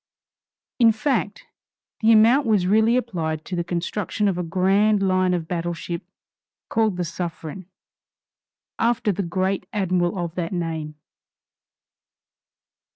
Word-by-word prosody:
In 230 -2 +6
fact, 220 -3 -2 0.5
the 225 0 +4
amount 230 +5 +5
was 205 -5 +3
really 220 +5 +4
applied 160 -10 -3
to 185 - -4
the 175 - -1
construction 180 +4 -2
of 195 - +1
a 180 - -2
grand 195 +4 +2
line 185 -1 +2
of 165 -2 -4
battle 175 0 -2
ship 170 +1 -5 0.7
called 220 -4 +1
the 180 - -1
Suffren, 170 +1 -6 1.1
after 230 -2 +1
the 200 - -2
great 185 +1 -1
Admiral 185 -3 0
of 170 -2 -3
that 175 0 -3
name. 160 -3 -3
185 Hz, 125 wpm, -23 LUFS, 170-215 Hz, 1.1 s, In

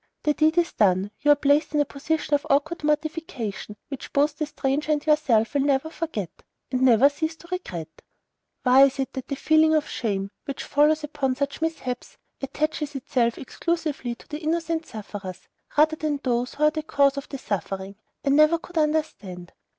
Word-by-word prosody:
The 300 - +3
deed 315 +2 +2
is 345 0 +2
done; 195 -1 +2
you 295 - +1
are 290 - +8
placed 290 +2 +2
in - - +3
a 290 - +3
position 295 +2 -2
of 290 0 +1
awkward 300 +4 +1
mortification, 300 - -2
which 275 -3 -7
both 290 +1 +2
the 305 -1 -2
stranger 295 0 -1
and 295 -1 0
yourself 270 -8 +3
will 285 - +2
never 280 +2 +1
forget, 305 - -5 0.3
and 255 -1 0
never 255 0 +6
cease 315 +3 -2
to 340 - -16
regret. 170 - -6 0.6
Why 260 +2 +7
it 275 0 -1
is 265 - 0
that 265 - -6
the 280 - -2
feeling 315 +2 +4
of 305 - +1
shame 200 -4 -2
which 275 - -5
follows 300 +2 +3
upon 285 -3 -1
such 280 +3 -3
mishaps 285 -6 -3 0.2
attaches 300 +1 -2
itself 245 -3 0
exclusively 295 -4 -3
to - - -18
the 300 - -5
innocent 330 0 -1
sufferers, 200 -3 -8 0.3
rather 310 +1 +5
than 305 -2 -1
to 275 -2 -4
those 240 +1 -1
who 300 - -2
are 300 - +6
the 310 0 -3
cause 280 -2 +2
of 280 - -5
the 275 - -5
suffering, 195 -3 -4 0.3
I - - +2
never 305 +4 +5
could 335 0 -4
understand. 300 - -2
285 Hz, 190 wpm, -25 LUFS, 250-310 Hz, 0.6 s, are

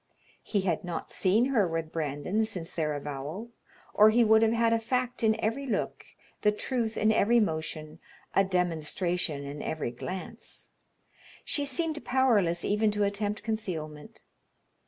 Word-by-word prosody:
He 205 - -1
had 180 -4 -1
not 175 -2 -5
seen 205 +6 +3
her 210 -7 +4
with 165 -1 -3
Brandon 155 +7 -1
since 185 -7 -4
their 155 -3 -1
avowal, 145 - -5 0.4
or 215 +1 +7
he 235 +2 +4
would 220 0 +5
have 225 0 +4
had 230 0 +3
a 230 - +3
fact 250 +2 -1
in 220 -1 +3
every 270 +6 -1
look, 240 - -2 0.4
the 210 - +4
truth 225 +1 -2
in 215 +1 +3
every 230 +2 +4
motion, 155 -4 -2 0.3
a 195 - +5
demonstration 175 -3 -1
in 140 +1 -6
every 155 -6 -3
glance. 180 +9 -7 0.7
She 290 - 0
seemed 305 +3 -1
powerless 220 -10 +2
even 210 +1 +2
to 210 0 0
attempt 205 +1 -1
concealment. 170 -10 -5
200 Hz, 150 wpm, -29 LUFS, 165-225 Hz, 0.7 s, or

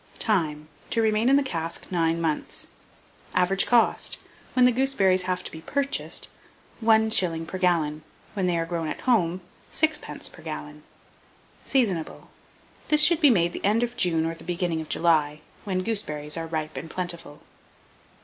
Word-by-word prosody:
Time. 155 -8 0 0.2
To 230 - 0
remain 220 +2 +2
in 275 - +5
the 285 - +3
cask 165 -9 -3
9 165 -2 +1
months. 160 -2 -2 0.7
Average 185 +2 +2
cost, 240 -1 +2 0.4
when 250 -1 +5
the 250 - +5
gooseberries 195 -8 +2
have 180 0 -1
to - - -6
be 160 - -9
purchased, 280 +9 -2 0.6
1s. 220 -7 +3
per 185 - -6
gallon; 160 -4 +1 0.3
when 190 -3 -1
they 175 -1 +1
are 165 - -1
grown 165 -1 -3
at 155 - -5
home, 185 -8 +1 0.3
6d. 315 0 0
per - - -14
gallon. - - -7 0.8
Seasonable. 200 - -1 0.6
This 300 -1 +6
should 330 +1 +6
be 295 - +7
made 175 -7 +2
the - - -7
end 215 +4 +2
of 240 0 -3
June 165 -6 +2
or 165 - -2
the 165 - -12
beginning 175 -2 -2
of 155 - -10
July, 155 -3 +1 0.2
when 185 -2 -1
gooseberries 150 -9 -1
are 165 -1 -4
ripe 155 -1 -4
and 165 - -6
plentiful. 170 -4 -5
180 Hz, 160 wpm, -25 LUFS, 165-225 Hz, 0.8 s, be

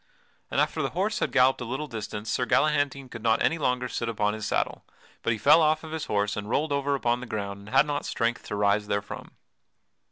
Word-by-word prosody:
And - - 0
after - - +1
the - - 0
horse 210 +4 0
had - - 0
galloped 130 -1 +4
a - - -3
little 130 +6 -3
distance 110 -4 -5
Sir 125 - 0
Galahantine 145 -1 +1
could 115 -2 -9
not 110 0 +3
any 165 - +2
longer 125 -3 0
sit 115 -1 -3
upon 105 -2 0
his 110 -1 -4
saddle, - - -1 0.4
but - - 0
he 110 - 0
fell 150 +9 +6
off 155 +1 +2
of 160 - -8
his 160 -1 -3
horse 100 0 0
and 105 0 -5
rolled 150 +5 0
over 140 0 +1
upon 120 -2 0
the 125 - -7
ground 100 -2 -4
and 100 +1 -12
had 135 +4 +5
not 145 -1 -3
strength 115 0 -1
to - - -3
rise 105 0 +2
therefrom. 100 0 -4
125 Hz, 230 wpm, -27 LUFS, 105-145 Hz, 0.4 s, fell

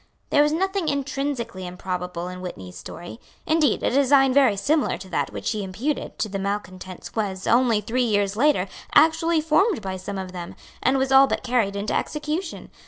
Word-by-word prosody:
There 290 - +5
was 295 0 +3
nothing 385 +2 -1
intrinsically 275 -9 -3
improbable 180 -1 -4
in 180 0 -7
Whitney's 95 - -8
story. 175 - -9 0.3
Indeed 310 -6 +2
a - - +2
design 270 0 +4
very 260 -7 +4
similar 300 +7 +1
to 190 - -10
that - - -1
which - - -3
he 215 -2 -2
imputed 230 +11 -3
to - - -1
the 200 -1 -4
malecontents 190 -2 -5
was, 195 -4 -2
only 235 -3 +3
three 245 +4 -1
years 205 -4 +1
later, 265 -5 +2 0.3
actually 325 +1 +4
formed 320 - +2
by 190 -1 -4
some 195 +2 -6
of 190 -1 -5
them, 175 -1 -7 0.3
and 265 +2 +2
was 265 0 0
all 270 +1 +7
but - - -2
carried 235 -5 +1
into 200 +1 -2
execution. 310 +4 -3
235 Hz, 180 wpm, -24 LUFS, 190-290 Hz, 0.3 s, all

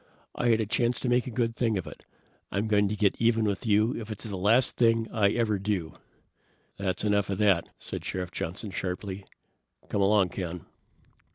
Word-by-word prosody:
I 120 - -1
had 115 -1 +4
a 110 - 0
chance 120 +2 +1
to 125 - -1
make 125 +1 +2
a - - -2
good 115 -1 -1
thing 115 -4 +1
of 90 - -3
it. - - -11 0.5
I'm 100 +3 -1
going 105 -2 +3
to 105 - -2
get 105 -2 +2
even 115 -1 +3
with 100 +3 -2
you 110 +3 +3
if 110 -1 -6
it's 110 - -6
the 105 -3 -5
last 110 +7 +3
thing 115 -1 +3
I 105 -3 +3
ever 110 -2 0
do!" 95 -5 -2 0.8
"That's 95 -2 -2
enough 100 -2 +1
of 100 - -1
that!" 100 -5 +3
said - - -6
Sheriff 90 -1 -4
Johnson 95 +5 -5
sharply. 95 +1 -4 0.6
"Come 100 - 0
along, 100 -1 +4
Ken." 90 -3 -5
105 Hz, 195 wpm, -28 LUFS, 95-115 Hz, 0.8 s, had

